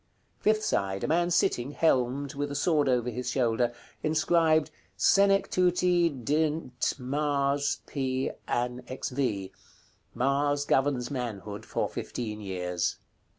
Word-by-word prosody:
Fifth 215 0 +2
side. 95 -1 -1
A - - 0
man 175 +3 +2
sitting, 140 -5 +1
helmed, 135 -2 +1
with 145 +1 -3
a 145 - -5
sword 145 -1 +2
over 125 -1 +1
his 125 +2 -4
shoulder. 120 -2 +1 0.3
Inscribed 160 0 +2 0.3
"SENECTUTI 180 - +3
DNT 150 -2 0
MARS. 140 +1 0
P. 130 -2 -2 0.2
AN. 125 +1 -1
XV." 125 -7 -2 0.6
Mars 145 +2 +1
governs 135 -3 +1
manhood 110 -6 -5
for - - -1
fifteen 110 -3 -5
years. 90 -3 -2
140 Hz, 110 wpm, -28 LUFS, 120-155 Hz, 0.6 s, SENECTUTI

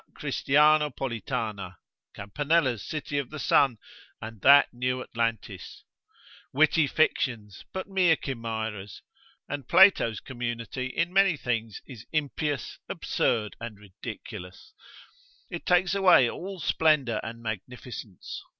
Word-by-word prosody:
Christianopolitana, 130 -9 +1 0.4
Campanella's 130 +3 0
city 145 +1 -3
of 140 - -5
the 155 - -8
Sun, 135 -4 +3 0.4
and 110 -2 -9
that 140 +4 +6
new 125 +1 -1
Atlantis, 115 -5 -4 0.7
witty 155 +2 +3
fictions, 120 -9 -1
but 190 - -4
mere 185 -4 +3
chimeras; 110 - -5 0.4
and 140 -3 -5
Plato's 185 - +5
community 120 0 -5
in 170 +7 -2
many 195 -4 +4
things 115 -5 -3
is 120 -5 -12
impious, 150 -3 -2
absurd 110 -3 -1
and 115 -2 -7
ridiculous, 95 - -10 0.8
it - - -7
takes 180 0 +3
away 185 -10 +6
all 190 +9 -6
splendour 150 -10 +2
and 115 +1 -8
magnificence. 110 -2 -7
125 Hz, 105 wpm, -27 LUFS, 110-155 Hz, 0.8 s, that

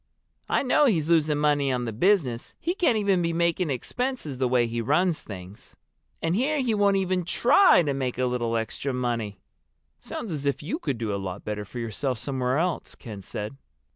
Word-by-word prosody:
I - - +2
know 280 +3 +4
he's 165 - +1
losing 155 -3 +3
money 145 -2 +2
on 125 -1 -1
the 115 - -3
business. 130 - +1
He 345 - -1
can't 330 - +2
even 200 -4 +2
be 170 -1 0
making 170 0 +1
expenses, 155 - -3
the 130 - +2
way 125 -1 +3
he 115 0 -2
runs 155 +7 +2
things. 95 0 -10 0.5
And 165 +2 +1
here 285 +7 +1
he 250 -4 +1
won't 200 -1 +3
even 185 -1 0
try 235 - +5
to 145 -3 0
make 130 -3 -2
a 130 - +1
little 120 -2 0
extra 120 +4 -3
money!" 115 -6 -2 0.6
"Sounds 205 -8 -6
as 145 -2 -3
if 140 0 -1
you 215 - -3
could 135 - -2
do 110 -3 -2
a 100 - -2
lot 95 -2 -6
better 105 -1 -3
for 110 - -10
yourself 120 +3 -2
somewhere 130 +1 -1
else," 175 +1 -1
Ken 105 -4 -9
said. 105 +6 -6
140 Hz, 200 wpm, -26 LUFS, 120-185 Hz, 0.6 s, try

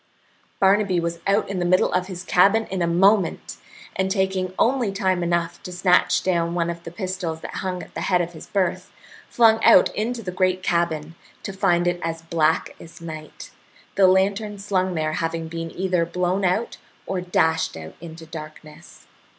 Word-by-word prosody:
Barnaby 195 -1 +3
was 170 0 -3
out 200 +2 +2
in 195 -2 -3
the - - 0
middle 185 +1 +2
of 185 - 0
his 180 -2 -7
cabin 200 +5 +3
in 190 -2 -2
a 170 - +1
moment, 190 +2 +2 0.4
and 190 0 0
taking 190 -2 0
only 245 -4 +2
time 190 -2 0
enough 170 0 -1
to 180 - -8
snatch 180 0 +2
down 170 -2 0
one 170 -1 0
of 170 0 -8
the - - -7
pistols 175 -3 -4
that - - -7
hung 185 -1 -3
at - - -15
the - - -5
head 180 -2 +2
of 175 0 -3
his 160 - -11
berth, 190 -4 -1 0.4
flung 225 -1 +4
out - - +6
into 230 +2 -2
the 185 - -4
great 185 0 0
cabin, 165 -3 -1 0.3
to 195 - -5
find 175 -3 +2
it 175 0 -1
as 165 0 -4
black 165 -1 0
as 165 +2 -13
night, 155 -2 -9 0.4
the 195 -1 +5
lantern 200 +3 +1
slung 190 -2 -1
there 155 -1 -1
having 165 0 -2
been 165 0 -5
either 180 0 0
blown 180 +3 -1
out 190 +6 0 0.3
or 190 -1 -3
dashed 160 - 0
out 80 0 -9
into 165 -1 -10
darkness. 155 0 -11
180 Hz, 185 wpm, -23 LUFS, 170-190 Hz, 0.4 s, out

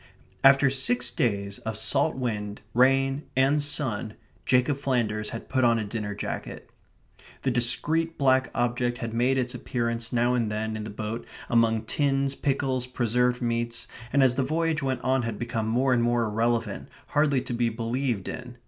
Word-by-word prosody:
After 135 0 +6
six 140 - 0
days 100 - -1
of 110 -1 -5
salt 145 +6 +2
wind, 105 -5 -3
rain, 135 +2 +3 0.2
and 140 +3 +3
sun, 125 -7 -2 0.3
Jacob 130 +2 +3
Flanders 115 -6 -1
had 115 - -7
put 130 -1 0
on 115 -1 +4
a 110 - -1
dinner 105 -1 -4
jacket. - - -6 0.7
The 130 - +1
discreet 155 +7 +2
black 130 -2 +3
object 120 0 0
had 115 -2 -5
made 125 +3 +2
its 125 0 -1
appearance 115 -1 -2
now 120 +1 +2
and 115 -4 0
then 110 +1 -2
in 105 -1 -5
the - - -6
boat 110 +3 -5 0.2
among 115 -2 +3
tins, 135 +2 0
pickles, 135 -2 -1
preserved 125 0 0
meats, 115 0 -2 0.2
and 140 0 +4
as 130 -2 +4
the 130 +1 0
voyage 160 +2 0
went 130 -2 -1
on 130 0 +1
had 115 -3 -4
become 115 -1 -3
more 125 +3 +2
and 120 - +2
more 120 0 +2
irrelevant, 115 0 -1 0.2
hardly 145 -2 +2
to 130 -1 -5
be 120 0 +1
believed 115 -1 -2
in. 125 -1 -7
120 Hz, 170 wpm, -26 LUFS, 115-135 Hz, 0.7 s, After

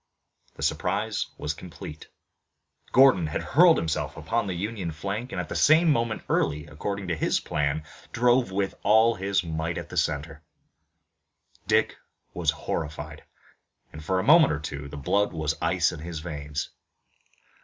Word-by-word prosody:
The - - -7
surprise 105 +4 -1
was - - -3
complete. 75 +1 -10 0.8
Gordon 130 -11 +6
had 75 - -3
hurled 170 +3 +5
himself 80 -1 -2
upon 110 +7 -1
the 95 - -3
Union 100 -1 -3
flank 100 - -4
and - - -3
at 90 - -3
the - - -6
same 160 +2 +5
moment 115 -4 0
Early, 75 +2 0
according 95 +6 -5
to 85 - 0
his 75 - +1
plan, 75 +1 -1 0.3
drove 120 -1 +3
with 95 0 -1
all 110 +3 +5
his 95 -2 0
might 80 0 -3
at - - -6
the - - -7
center. 75 +2 -1 1.3
Dick - - +2 0.4
was 85 -3 0
horrified, 75 0 -4 0.7
and, 80 - -9
for 95 +4 0
a - - -1
moment 160 +1 +6
or 75 - -1
two, 70 -2 -6
the 70 - -8
blood 100 +9 +1
was 80 -1 -1
ice 85 +1 +2
in 85 - -8
his 80 0 -6
veins. 75 -2 -5
90 Hz, 155 wpm, -26 LUFS, 75-110 Hz, 1.3 s, Gordon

